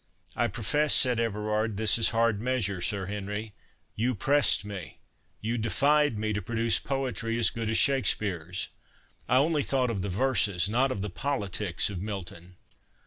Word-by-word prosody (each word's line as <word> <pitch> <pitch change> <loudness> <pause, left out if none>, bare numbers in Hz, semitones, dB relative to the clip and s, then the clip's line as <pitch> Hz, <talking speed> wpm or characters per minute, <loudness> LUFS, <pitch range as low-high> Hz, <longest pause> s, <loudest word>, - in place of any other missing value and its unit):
"I - - +1
profess," 145 +7 +1
said 125 -3 +3
Everard, 105 -1 -1
"this 110 +1 +3
is 115 - +4
hard 115 -2 +1
measure, 110 -7 -1
Sir 100 +1 -1
Henry. 105 +2 -5 0.4
You 120 +3 0
pressed 140 0 +3
me—you 105 +4 -7
defied 145 +3 +2
me, 110 0 -1
to 105 - -2
produce 115 +3 +1
poetry 125 -4 -3
as 120 - +3
good 115 -1 -4
as 115 - +2
Shakspeare's. 95 - +1 0.6
I 125 - +4
only 150 +2 +2
thought 130 -3 0
of 100 -4 -3
the 100 - -3
verses, 100 -4 +2
not 125 +5 +1
of 100 -6 -3
the 105 - -4
politics 100 -6 -1
of 90 -3 -5
Milton." 90 -3 -7
110 Hz, 155 wpm, -28 LUFS, 100-125 Hz, 0.6 s, is